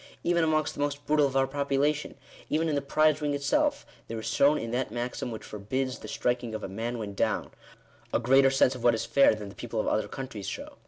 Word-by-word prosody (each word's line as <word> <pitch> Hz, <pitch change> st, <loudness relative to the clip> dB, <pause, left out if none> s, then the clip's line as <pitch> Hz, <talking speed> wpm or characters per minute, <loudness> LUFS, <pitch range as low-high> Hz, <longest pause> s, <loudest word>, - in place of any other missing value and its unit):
Even 170 Hz, -1 st, +2 dB
amongst 155 Hz, -1 st, +1 dB
the -, -, -11 dB
most 145 Hz, 0 st, -2 dB
brutal 150 Hz, -1 st, +3 dB
of 135 Hz, 0 st, -2 dB
our 135 Hz, -, +4 dB
population 140 Hz, +2 st, 0 dB, 0.2 s
— -, -, -20 dB
even 160 Hz, +2 st, +1 dB
in 155 Hz, -, 0 dB
the 140 Hz, -, +1 dB
prize 155 Hz, +2 st, +2 dB
ring 145 Hz, -1 st, 0 dB
itself, 290 Hz, -, +1 dB, 0.2 s
there 115 Hz, -, -5 dB
is 110 Hz, -, -6 dB
shown 140 Hz, +6 st, +3 dB
in 115 Hz, -, -4 dB
that 125 Hz, 0 st, -1 dB
maxim 120 Hz, +2 st, -4 dB
which 110 Hz, -2 st, -7 dB
forbids 130 Hz, +6 st, -3 dB
the -, -, -9 dB
striking 120 Hz, -2 st, -1 dB
of 110 Hz, -, -5 dB
a -, -, -3 dB
man 115 Hz, +5 st, -4 dB
when 105 Hz, -3 st, -5 dB
down, 100 Hz, -, -1 dB, 0.6 s
a -, -, +3 dB
greater 135 Hz, +2 st, +5 dB
sense 135 Hz, -1 st, +3 dB
of 125 Hz, -2 st, -8 dB
what 120 Hz, -1 st, +5 dB
is 110 Hz, -, -3 dB
fair 140 Hz, -5 st, +5 dB
than 105 Hz, -2 st, -7 dB
the -, -, -11 dB
people 115 Hz, 0 st, -5 dB
of -, -, 0 dB
other 110 Hz, -, +1 dB
countries 130 Hz, -7 st, -6 dB
show. -, -, -7 dB
135 Hz, 245 wpm, -28 LUFS, 115-145 Hz, 0.6 s, greater